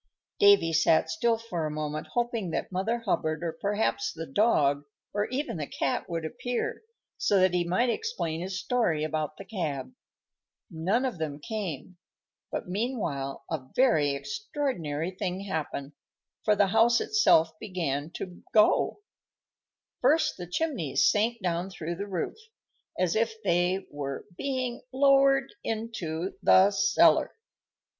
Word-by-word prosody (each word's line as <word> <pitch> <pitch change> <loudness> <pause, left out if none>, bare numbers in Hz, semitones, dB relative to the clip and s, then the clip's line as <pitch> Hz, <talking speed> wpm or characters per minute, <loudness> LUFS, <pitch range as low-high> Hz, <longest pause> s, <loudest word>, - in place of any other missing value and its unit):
Davy 200 -5 +6
sat 160 +1 +3
still 235 -8 +1
for 180 -9 -3
a - - -3
moment, 150 0 -4
hoping 235 -5 0
that 165 - -3
Mother 220 +6 -1
Hubbard, 155 -5 0
or 170 - -1
perhaps 160 - -1
the 165 +7 -6
dog, 145 -5 +2 0.3
or 205 0 0
even 260 - -3
the 150 -2 -4
cat, 135 - -2
would 165 -2 -3
appear, 245 +7 -3 0.4
so 200 - +3
that 185 -1 +4
he 175 -1 +2
might 190 +8 +1
explain 425 - -3
his 190 +1 -3
story 190 -11 +1
about 155 -1 -2
the 195 - -9
cab. 170 - -4 0.8
None 190 +10 0
of 245 -10 -3
them 150 -2 -3
came; 185 - -5 0.5
but - - -4
meanwhile 180 - -3
a 140 -5 -3
very 155 - +3
extraordinary 190 - -3
thing 185 0 -3
happened, 155 -7 -4 0.5
for 210 - +4
the 200 0 +4
house 230 +3 +4
itself 165 - +4
began 160 -7 -3
to 180 -1 -7
go. 215 - +4 1.0
First 300 +6 +3
the 180 - -7
chimneys 230 - +1
sank 225 +3 +1
down 175 +1 -1
through 170 -3 -5
the 200 +2 -4
roof, 185 -4 -3 0.6
as 180 -2 +1
if 225 0 +1
they 180 +1 +1
were 140 -2 -5
being 255 0 -2
lowered 275 0 +4
into 195 -7 -3
the 190 +2 +6
cellar. 200 +1 +4
185 Hz, 140 wpm, -28 LUFS, 160-230 Hz, 1.0 s, Davy